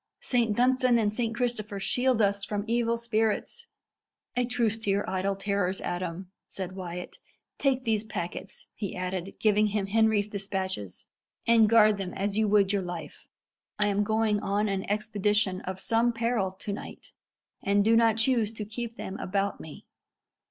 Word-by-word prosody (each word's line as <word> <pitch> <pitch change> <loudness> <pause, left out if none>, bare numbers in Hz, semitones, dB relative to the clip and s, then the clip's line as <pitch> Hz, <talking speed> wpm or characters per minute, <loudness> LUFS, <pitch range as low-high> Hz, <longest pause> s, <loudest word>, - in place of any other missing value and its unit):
"Saint 230 -4 +1
Dunstan 255 0 +4
and 210 -2 +1
Saint 230 0 -1
Christopher 235 -4 -2
shield 245 +3 +2
us 200 0 +1
from 205 0 -2
evil 235 0 +1
spirits!" 230 - -1 0.7
"A 245 0 +2
truce 235 -3 0
to 220 - -3
your 200 +1 +1
idle 190 +1 -1
terrors, 195 -1 -1
Adam," 180 +1 -4 0.2
said 190 -2 -5
Wyat. 180 -1 -6 0.4
"Take 265 -2 +1
these 220 -2 +1
packets," 175 -6 -6
he 200 -4 -5
added, 185 +1 -4
giving 210 0 +3
him 205 -1 -1
Henry's 215 0 +2
despatches, 190 - -4 0.4
"and 225 -2 +5
guard 215 -2 +6
them 190 -2 -5
as 200 +1 -1
you 220 0 +2
would 200 -1 +3
your 200 - +1
life. 175 -4 -7 0.5
I 210 0 +2
am 205 +1 +1
going 215 0 +1
on 205 +1 0
an 195 -2 -2
expedition 210 -2 +1
of 185 0 -4
some 230 +4 +2
peril 230 -4 0
to 200 +2 -5
night, - - -9 0.5
and 200 0 +2
do 225 +1 +5
not 225 -1 +4
choose 225 -2 +2
to 215 -1 -5
keep 230 +2 -5
them 195 -3 -6
about 195 +1 -1
me. 155 - -11
210 Hz, 165 wpm, -28 LUFS, 195-225 Hz, 0.7 s, guard